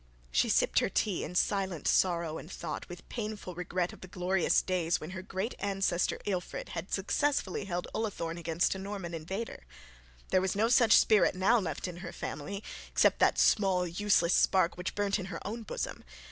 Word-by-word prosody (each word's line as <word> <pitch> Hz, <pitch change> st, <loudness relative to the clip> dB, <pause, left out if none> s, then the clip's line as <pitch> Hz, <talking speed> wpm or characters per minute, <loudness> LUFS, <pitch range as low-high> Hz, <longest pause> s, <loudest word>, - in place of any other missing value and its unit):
She -, -, +2 dB
sipped -, -, +3 dB
her -, -, 0 dB
tea 200 Hz, -5 st, 0 dB
in 180 Hz, -, -6 dB
silent 190 Hz, -4 st, 0 dB
sorrow, 170 Hz, -3 st, +2 dB
and 165 Hz, -, -11 dB
thought 165 Hz, -4 st, -5 dB
with 175 Hz, 0 st, -10 dB
painful 215 Hz, -5 st, -5 dB
regret 180 Hz, 0 st, -2 dB
of -, -, -14 dB
the 185 Hz, -, -9 dB
glorious 180 Hz, 0 st, +1 dB
days 180 Hz, -2 st, 0 dB
when -, -, -7 dB
her 185 Hz, 0 st, -5 dB
great 195 Hz, +4 st, -3 dB
ancestor 195 Hz, -3 st, 0 dB
Ealfried 185 Hz, -4 st, -3 dB
had 165 Hz, +3 st, -6 dB
successfully 205 Hz, -1 st, 0 dB
held 175 Hz, -2 st, -3 dB
Ullathorne 175 Hz, -6 st, -3 dB
against 165 Hz, +1 st, +1 dB
a 190 Hz, -, -6 dB
Norman 195 Hz, -3 st, -5 dB
invader. 190 Hz, -, -5 dB, 0.7 s
There 185 Hz, -, +3 dB
was 190 Hz, 0 st, -1 dB
no 220 Hz, +3 st, +2 dB
such 235 Hz, -3 st, +6 dB
spirit 215 Hz, -4 st, +4 dB
now 195 Hz, +6 st, +4 dB
left 180 Hz, -2 st, -3 dB
in 175 Hz, -1 st, -7 dB
her 175 Hz, -1 st, -7 dB
family 200 Hz, +8 st, -5 dB, 0.3 s
except -, -, +3 dB
that -, -, +4 dB
small 190 Hz, -4 st, +3 dB
useless 175 Hz, 0 st, +2 dB
spark 185 Hz, -3 st, +3 dB
which 180 Hz, +1 st, -4 dB
burnt 205 Hz, 0 st, +1 dB
in 190 Hz, -, -4 dB
her 195 Hz, -, -5 dB
own 225 Hz, +4 st, -4 dB
bosom. 220 Hz, -, -5 dB
185 Hz, 185 wpm, -31 LUFS, 175-200 Hz, 0.7 s, such